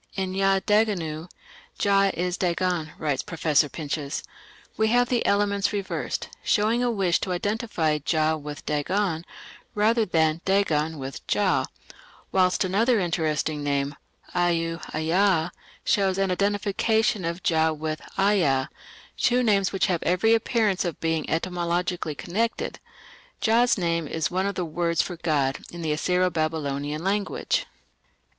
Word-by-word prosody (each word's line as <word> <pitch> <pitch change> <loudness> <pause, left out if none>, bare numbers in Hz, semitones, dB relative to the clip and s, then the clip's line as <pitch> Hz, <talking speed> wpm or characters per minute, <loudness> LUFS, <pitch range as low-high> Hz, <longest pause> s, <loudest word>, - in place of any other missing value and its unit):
"In 190 -1 -2
Ya 195 0 +3
Daganu, 180 -7 +1 0.5
'Jah 195 -1 +3
is 180 +1 -1
Dagon'", 175 -3 -1
writes 145 -4 -1
Professor 155 -3 +1
Pinches, 145 -2 -4 0.5
"we 220 - +2
have 245 +2 +3
the 245 -2 +1
elements 200 0 +2
reversed, 200 -2 -3
showing 220 +3 +2
a 245 - +2
wish 195 -6 +1
to 185 - -3
identify 180 -5 0
Jah 155 +1 +1
with 150 0 -8
Dagon, 165 +3 0 0.5
rather 220 +2 +3
than 160 -4 +1
Dagon 160 -5 +1
with 135 -1 -7
Jah; - - +2 0.6
whilst 185 0 +3
another 220 +5 +2
interesting 155 -4 -1
name, 140 0 0 0.4
Au 165 -1 0
Aa, 170 +2 +2 0.3
shows 195 -2 +2
an 195 -1 +1
identification 205 +2 +1
of 170 +2 -3
Jah 160 -2 +3
with 155 0 -4 0.2
Aa, 180 -10 +2 0.5
two 250 +1 +2
names 200 -4 +2
which 195 - +1
have 175 -3 0
every 185 +6 +3
appearance 225 -4 +1
of 175 -3 -4
being 160 -1 -1
etymologically 175 -1 -1
connected." 225 +10 -2 0.6
Jah's 235 +2 +3
name 170 -3 0
"is 160 +3 -2
one 185 +2 0
of 200 - -3
the 180 - -1
words 170 +1 0
for 180 - -6
'god' 145 -5 0
in 170 -1 -7
the 155 - 0
Assyro 180 +4 +1
Babylonian 150 -1 -2
language". 200 +1 -1
175 Hz, 135 wpm, -25 LUFS, 160-200 Hz, 0.6 s, Ya